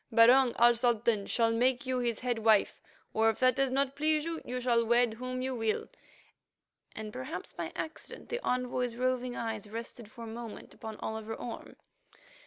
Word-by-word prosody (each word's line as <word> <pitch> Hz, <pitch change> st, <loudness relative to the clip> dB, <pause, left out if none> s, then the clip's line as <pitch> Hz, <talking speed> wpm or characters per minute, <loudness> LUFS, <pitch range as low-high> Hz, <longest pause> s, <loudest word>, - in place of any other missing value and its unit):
Barung, 240 Hz, +2 st, +6 dB
our 240 Hz, +1 st, +6 dB
Sultan, 235 Hz, -3 st, +1 dB
shall 230 Hz, -1 st, +2 dB
make 250 Hz, +4 st, +2 dB
you 255 Hz, -1 st, 0 dB
his 235 Hz, -3 st, -1 dB
head 245 Hz, -2 st, -1 dB
wife; 220 Hz, -2 st, +3 dB, 0.3 s
or, 220 Hz, +1 st, +4 dB
if 220 Hz, -, -1 dB
that 255 Hz, -1 st, +4 dB
does 275 Hz, -1 st, +2 dB
not 270 Hz, +1 st, 0 dB
please 305 Hz, +1 st, +2 dB
you, 330 Hz, -1 st, -3 dB
you 250 Hz, +1 st, -4 dB
shall 240 Hz, -2 st, +2 dB
wed 235 Hz, 0 st, +3 dB
whom 255 Hz, +2 st, -4 dB
you 260 Hz, 0 st, -1 dB
will"—and, 220 Hz, -1 st, -7 dB
perhaps 130 Hz, +8 st, -6 dB
by 170 Hz, -2 st, -5 dB
accident, 315 Hz, 0 st, -7 dB
the 480 Hz, +1 st, -3 dB
envoy's 250 Hz, -1 st, -1 dB
roving 250 Hz, 0 st, -1 dB
eyes 220 Hz, -2 st, -4 dB
rested 230 Hz, 0 st, -7 dB
for 230 Hz, +1 st, -10 dB
a -, -, -7 dB
moment 230 Hz, 0 st, -8 dB
upon 220 Hz, -1 st, -8 dB
Oliver 220 Hz, 0 st, -4 dB
Orme. 240 Hz, -, -7 dB
240 Hz, 175 wpm, -31 LUFS, 225-255 Hz, 0.3 s, Barung